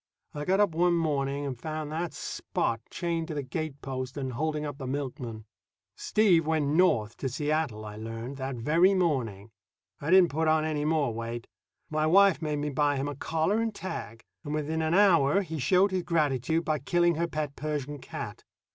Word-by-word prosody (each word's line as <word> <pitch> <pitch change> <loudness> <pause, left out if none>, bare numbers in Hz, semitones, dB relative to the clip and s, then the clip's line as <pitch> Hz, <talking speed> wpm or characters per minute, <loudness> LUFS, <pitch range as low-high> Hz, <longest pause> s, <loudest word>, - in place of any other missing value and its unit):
I 150 0 -4
got 190 +2 +2
up 205 -3 +4
one 170 +2 +2
morning 145 -3 0
and 130 -4 -5
found 155 -1 -4
that 165 +2 -2
Spot 115 -1 -2
chained 170 -2 -2
to 160 - -5
the 145 - -2
gate 145 +1 -4
post 130 0 -4
and 130 -2 -3
holding 150 +3 -1
up 145 -1 -6
the 135 - -5
milkman. 125 -5 -4 0.5
Steve 180 -7 +3
went 155 -3 +1
north 145 -10 +3
to 135 - -2
Seattle, 145 -5 -1
I 105 0 -8
learned, 115 +4 -6
that 135 -1 -3
very 165 +11 +3
morning. 120 - -1 0.5
I 145 - -4
didn't 185 -1 +6
put 160 +3 0
on 155 0 +3
any 150 -2 -1
more 150 -6 +1
weight. 115 +1 -5 0.5
My 155 0 +1
wife 195 +1 +5
made 150 -2 -1
me 145 0 -2
buy 145 +1 +2
him 135 +1 -2
a 145 - -3
collar 160 - 0
and 225 -2 -2
tag, 115 - -6 0.2
and 150 - -3
within 155 +1 -1
an 160 +2 +1
hour 185 -3 +5
he 160 -3 -5
showed 185 +7 +3
his 185 -1 0
gratitude 160 -2 0
by 155 -1 0
killing 175 +5 +2
her 170 +2 -1
pet 150 -3 -3
Persian 145 -1 -3
cat. - - -7
150 Hz, 190 wpm, -28 LUFS, 135-165 Hz, 0.5 s, didn't